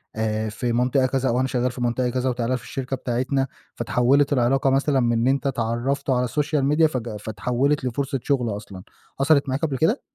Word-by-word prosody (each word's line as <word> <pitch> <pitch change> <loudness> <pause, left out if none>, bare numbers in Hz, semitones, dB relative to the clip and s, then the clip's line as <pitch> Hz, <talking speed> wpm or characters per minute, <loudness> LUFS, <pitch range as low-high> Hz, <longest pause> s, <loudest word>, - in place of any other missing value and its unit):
آآ 110 0 -1
في 120 +2 -2
منطقة 125 +2 +2
كذا 130 0 0
وأنا 125 +2 +1
شغّال 125 -1 0
في 125 - -8
منطقة 120 +1 0
كذا 130 +1 -1
وتعال 125 0 -1
في - - -13
الشركة 135 0 -4
بتاعتنا، 130 +2 -1 0.3
فاتحوّلت 140 +4 +2
العلاقة 135 +1 +2
مثلًا 135 +1 +2
من 120 -1 +2
إن 115 +1 +1
أنت 140 +1 +1
اتعرّفتوا 125 +2 -1
على 125 0 +1
الSocial 145 +3 0
Media 160 +1 +5
فج 120 -7 -2
فاتحوّلت 125 +7 -1
لفرصة 135 +3 -2
شُغل 125 -5 0
أصلًا. 100 -3 -10 0.4
حصلت 140 -1 +3
معاك 130 - -1
قبل 145 -5 -1
كده؟ 165 - +2
130 Hz, 190 wpm, -23 LUFS, 120-135 Hz, 0.4 s, Media